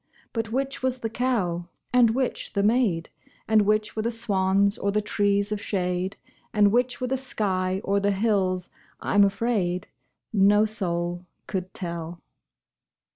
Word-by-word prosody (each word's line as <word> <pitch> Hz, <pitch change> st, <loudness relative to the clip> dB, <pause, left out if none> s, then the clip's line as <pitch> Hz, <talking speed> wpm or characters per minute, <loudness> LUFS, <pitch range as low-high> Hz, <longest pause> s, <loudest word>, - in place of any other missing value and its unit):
But 225 Hz, -1 st, -2 dB
which 275 Hz, +2 st, -2 dB
was 260 Hz, -1 st, -1 dB
the 225 Hz, -, -3 dB
cow 195 Hz, -9 st, 0 dB, 0.3 s
and 235 Hz, -2 st, +5 dB
which 260 Hz, -1 st, -2 dB
the 200 Hz, -, +1 dB
maid, 210 Hz, -7 st, +2 dB, 0.4 s
And 220 Hz, -1 st, +5 dB
which 215 Hz, 0 st, +1 dB
were 220 Hz, -, -1 dB
the 230 Hz, -, 0 dB
swans 200 Hz, -3 st, +1 dB
or 200 Hz, -, 0 dB
the 210 Hz, -, +2 dB
trees 205 Hz, 0 st, +1 dB
of 210 Hz, -1 st, -2 dB
shade, 180 Hz, -1 st, -2 dB, 0.4 s
And 205 Hz, -1 st, +5 dB
which 245 Hz, +2 st, +1 dB
were 255 Hz, -, -1 dB
the 265 Hz, +1 st, 0 dB
sky 190 Hz, -7 st, -1 dB
or 200 Hz, +1 st, +1 dB
the 200 Hz, 0 st, +1 dB
hills, 195 Hz, -3 st, +1 dB, 0.3 s
I'm 205 Hz, 0 st, +3 dB
afraid, 195 Hz, -3 st, 0 dB, 0.4 s
No 205 Hz, +1 st, +5 dB
soul 175 Hz, -4 st, -3 dB, 0.2 s
could 185 Hz, -1 st, -4 dB
tell. 170 Hz, -1 st, -5 dB
205 Hz, 150 wpm, -25 LUFS, 185-225 Hz, 0.4 s, and